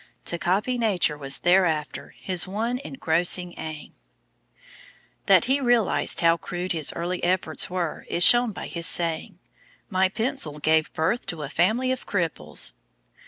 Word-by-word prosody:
To 170 - -1
copy 205 +9 0
Nature 195 -9 +1
was 135 -2 -4
thereafter 175 -4 0
his 185 -2 -1
one 225 +6 -2
engrossing 175 - 0
aim. 155 -1 -8 1.3
That - - +5
he 270 +3 +1
realised 240 -5 +1
how 165 0 +4
crude 180 +1 -5
his 160 -4 +1
early 175 +2 -4
efforts 175 -3 +1
were 175 -3 -4
is 175 - +3
shown 240 -1 +7
by - - -7
his 170 -1 -2
saying: 170 +3 0 0.5
"My 190 0 +2
pencil 220 - -2
gave 155 +1 +1
birth 180 +10 -1
to 165 -5 -5
a 140 - -6
family 220 - +1
of 260 - -5
cripples." - - -2
180 Hz, 145 wpm, -24 LUFS, 165-220 Hz, 1.3 s, shown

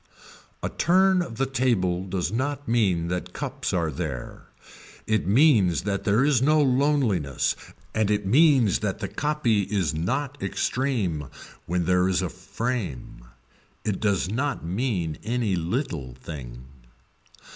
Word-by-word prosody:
A - - 0
turn 185 +1 +3
of 120 -10 -5
the 135 - +1
table 115 -9 0
does 90 -3 -2
not 145 +4 -2
mean 95 -8 +2
that 90 0 -3
cups - - -3
are 85 -4 0
there, 70 -4 -6 0.6
it 110 -5 0
means 105 - +4
that 100 0 -2
there 110 +5 +3
is 140 -5 +3
no 155 +3 +4
loneliness 130 - +2 0.4
and 110 -2 +1
it 105 -1 0
means 130 - +4
that 105 -3 -2
the 105 - -4
copy 140 -5 0
is 95 -4 -1
not 140 - -2
extreme 105 - -1 0.4
when 90 0 0
there 90 +1 +3
is 95 0 +1
a 90 - -2
frame. 90 - -5 0.6
It 105 -3 -1
does 100 -4 +1
not 130 - -2
mean 90 - -2
any 115 -3 0
little 85 - -3
thing. 65 -4 -9
100 Hz, 135 wpm, -25 LUFS, 90-130 Hz, 0.6 s, means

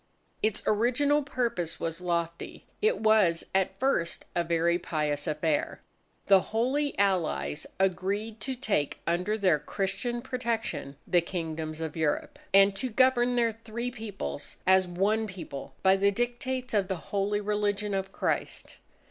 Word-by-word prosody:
Its 215 -1 0
original 255 +7 +3
purpose 235 - -2
was 165 +1 -3
lofty. 170 -1 -3 0.2
It 435 +2 +3
was 215 -6 +4
at 190 0 +1
first, 255 -11 0
a 175 - +2
very 170 +1 +2
pious 150 -3 -2
affair. 155 0 0 0.5
The 195 -1 +7
Holy 260 +9 0
Allies 185 -6 0
agreed 200 +4 0
to 265 +2 -3
take 205 - 0
under 180 +5 0
their 185 -7 +3
Christian 235 - -2
protection 230 - -3
the 175 - +3
Kingdoms 160 -2 -4
of 160 -2 -4
Europe, 155 -3 -1
and 195 0 +6
to 255 - -1
govern 245 +1 +3
their 235 -1 +3
three 230 +2 -5
Peoples 205 - -6
as 190 0 +5
one 205 +5 +1
People 140 -8 -8
by 190 0 +6
the 200 +1 +4
dictates 245 +3 -2
of 200 -3 +2
the 190 - -1 0.2
Holy 205 +1 +1
Religion 205 0 0
of 195 0 -2
Christ. - - -3
195 Hz, 140 wpm, -28 LUFS, 170-230 Hz, 0.5 s, The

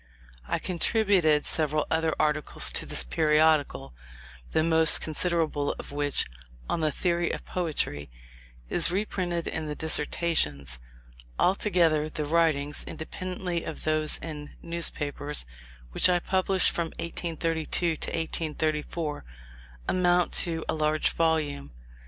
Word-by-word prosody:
I - - 0
contributed 180 -4 +2
several 155 -1 0
other 160 0 0
articles 150 -1 +3
to - - 0
this - - +2
periodical, 150 - +1 0.6
the 160 - +2
most 160 -1 +6
considerable 160 -2 -1
of - - -9
which 145 -1 +1 0.4
(on - - -1
the 155 -1 +1
theory 175 +1 -1
of - - -5
Poetry), 150 - -2 0.6
is - - +3
reprinted 180 -3 -2
in 160 -1 -4
the 150 - -4
"Dissertations." 145 - 0 0.6
Altogether, 170 -5 +2
the 150 -1 -4
writings 150 -2 +1
(independently 180 +1 -5
of 160 - -7
those 155 -1 +2
in 150 -2 -8
newspapers) 150 - +1 0.5
which 185 - +4
I 180 - +3
published 190 +1 +3
from 170 -1 -2
1832 165 0 -2
to - - -3
1834, 155 -1 -3 0.6
amount 180 -1 +2
to 165 -2 +1
a - - 0
large 155 0 +1
volume. 155 - -1
160 Hz, 115 wpm, -27 LUFS, 150-170 Hz, 0.6 s, most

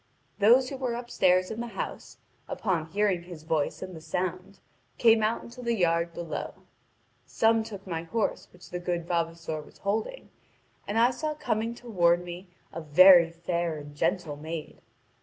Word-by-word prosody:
Those 245 +5 +5
who 275 - -5
were 255 -3 -2
upstairs 185 -6 +2
in 220 +1 -4
the 240 - -4
house, - - -5 0.3
upon 175 -7 -1
hearing 195 0 +1
his 170 -3 -11
voice 160 0 -1
and 185 -1 -8
the 160 - -9
sound, 185 +4 -4 0.4
came 225 -2 +5
out 215 +2 0
into 245 +2 -11
the 235 -1 0
yard 170 -3 +1
below. 170 -1 -5 0.7
Some 225 0 +3
took 200 -3 -9
my 165 -4 -3
horse 200 +5 -2
which 180 - -16
the 180 - -3
good 175 -1 -2
vavasor 165 -2 -2
was - - -17
holding; 220 - -3 0.6
and 205 - -2
I 235 +2 +5
saw 305 +4 -3
coming 230 -4 -2
toward 175 -8 +1
me 175 +2 -8 0.3
a 165 - -5
very 170 +2 +7
fair 170 -1 -2
and 145 0 -10
gentle 160 -2 -1
maid. 160 +1 -7
180 Hz, 165 wpm, -28 LUFS, 170-220 Hz, 0.7 s, very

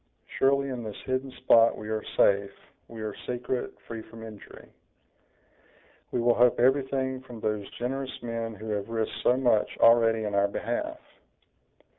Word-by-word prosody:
Surely, 140 +1 +3
in 125 -2 -4
this 105 -2 -6
hidden 130 +1 -1
spot 115 0 +6
we 105 - -7
are 110 -1 -2
safe, 100 0 +4 0.4
we 115 -1 -8
are 105 -1 -3
secret, 125 +1 -2
free 115 -1 -6
from 115 +1 -12
injury; 110 -3 -11 1.4
we - - -1
will 120 0 +4
hope 120 0 +4
everything 130 0 +1
from 125 -3 -11
those 105 -2 -2
generous 130 +2 -3
men 115 -1 -4
who 110 +2 -8
have 105 0 -2
risked 115 -1 -2
so 125 - +3
much 120 -5 +2
already 115 -1 +5
in 105 -1 -3
our 100 0 +3
behalf." 100 - -3
115 Hz, 155 wpm, -27 LUFS, 110-130 Hz, 1.4 s, spot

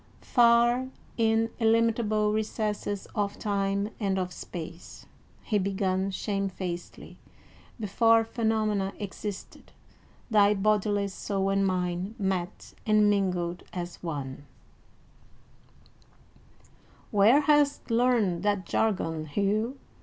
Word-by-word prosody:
"Far 240 +1 +4 0.3
in 225 0 +2
illimitable 225 -2 +2
recesses 210 -2 -2
of 205 -2 -2
time 200 0 -1
and 195 -3 0
of 180 -1 -2
space," 170 -1 -9 0.4
he 210 -3 +1
began 190 0 0
shamefacedly, 190 -3 -4 0.6
"before 225 +2 +3
phenomena 220 -4 0
existed, 205 0 -7 0.6
thy 210 -2 +4
bodiless 205 -1 +1
soul 195 -1 -1
and 195 0 +2
mine 180 +2 -2
met 190 -4 -3
and 210 -1 +5
mingled 180 -3 -1
as 175 -1 -6
one" 145 -4 -5 2.7
"Where 220 +7 +5
hast 295 -3 +2
learned 230 -7 +2
that 205 -2 0
jargon, 165 -7 -1
Hugh?" 210 - 0
205 Hz, 95 wpm, -28 LUFS, 190-220 Hz, 2.7 s, and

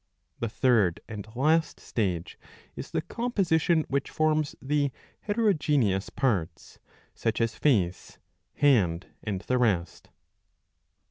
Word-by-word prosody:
The 115 - -2
third 110 -8 +2
and 105 -1 -7
last 155 +5 +2
stage 90 -7 -3 0.4
is - - -7
the - - -2
composition 175 -9 +1
which 140 0 -1
forms 155 -1 +1
the 145 0 0 0.3
heterogeneous 150 - +1
parts, 90 -11 -2 0.3
such - - -1
as 115 -1 +1
face, 95 -11 0 0.4
hand, 95 - +3 0.2
and 100 -4 -3
the 125 +3 0
rest. 95 -8 0
125 Hz, 110 wpm, -27 LUFS, 100-155 Hz, 0.4 s, hand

